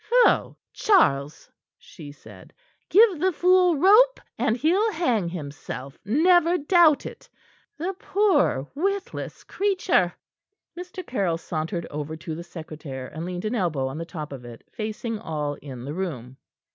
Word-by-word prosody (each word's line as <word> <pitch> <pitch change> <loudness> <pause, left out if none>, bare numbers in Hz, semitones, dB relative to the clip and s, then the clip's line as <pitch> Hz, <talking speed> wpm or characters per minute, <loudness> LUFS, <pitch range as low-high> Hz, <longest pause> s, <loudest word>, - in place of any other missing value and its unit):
"Pho! 475 +3 +3 0.2
Charles," 150 - +2 0.3
she 145 -2 -12
said; 145 - -15 0.4
"give 410 -5 +5
the 375 +3 +2
fool 360 0 +4
rope, 430 - +5 0.2
and 220 - 0
he'll 370 - +2
hang 245 - 0
himself, 140 -4 -7
never 340 - +4
doubt 320 -1 +4
it - - -10 0.5
the 355 +5 -3
poor, 355 - +2
witless 390 +6 -3
creature." 375 - +1 0.6
Mr. 360 +1 -8
Caryll 195 - -1
sauntered 165 +1 -4
over 150 +1 -5
to 160 0 -7
the 170 +2 -6
secretaire, 155 -6 -8
and 160 +2 -6
leaned 180 +2 -5
an 215 - -1
elbow 170 - 0
on 145 +4 -6
the - - -3
top 155 -4 -7
of 130 -3 -9
it, 120 -1 -11
facing 220 0 -4
all 150 -7 -3
in 130 -4 -8
the 145 - -5
room. 135 -9 -5
200 Hz, 145 wpm, -24 LUFS, -, 0.6 s, give